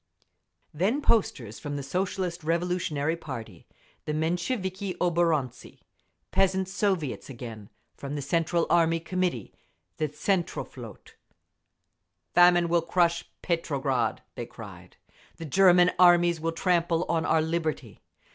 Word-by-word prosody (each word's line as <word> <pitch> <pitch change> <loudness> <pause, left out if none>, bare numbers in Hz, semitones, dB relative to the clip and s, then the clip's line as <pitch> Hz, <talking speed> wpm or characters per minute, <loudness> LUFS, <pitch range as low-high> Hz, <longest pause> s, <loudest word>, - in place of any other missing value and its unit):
Then 195 - +1
posters 130 - 0
from 145 -1 -5
the 140 - -4
Socialist 180 +2 -2
Revolutionary 165 -2 -1
party, 115 - -9 0.4
the 150 - -2
Mensheviki 185 +3 -2
oborontsi, 165 -7 -1 0.5
Peasants' 190 0 +1
Soviets 190 - -1
again; 115 -5 -9 0.3
from 140 +1 -6
the 145 - -3
Central 165 +4 +1
Army 165 -1 +3
Committee, 175 - -2 0.4
the 155 - 0
Tsentroflot….… 175 +4 -4 1.2
Famine 175 0 +6
will 170 0 +2
crush 170 0 +1
Petrograd! 140 - -1
(they - - -6
cried). - - -12 0.4
The 165 - -7
German 180 +2 +5
armies 175 -2 +5
will 165 +1 0
trample 170 -1 +1
on 165 -1 0
our 160 -1 +2
liberty. 160 -8 -3
170 Hz, 110 wpm, -27 LUFS, 150-180 Hz, 1.2 s, Famine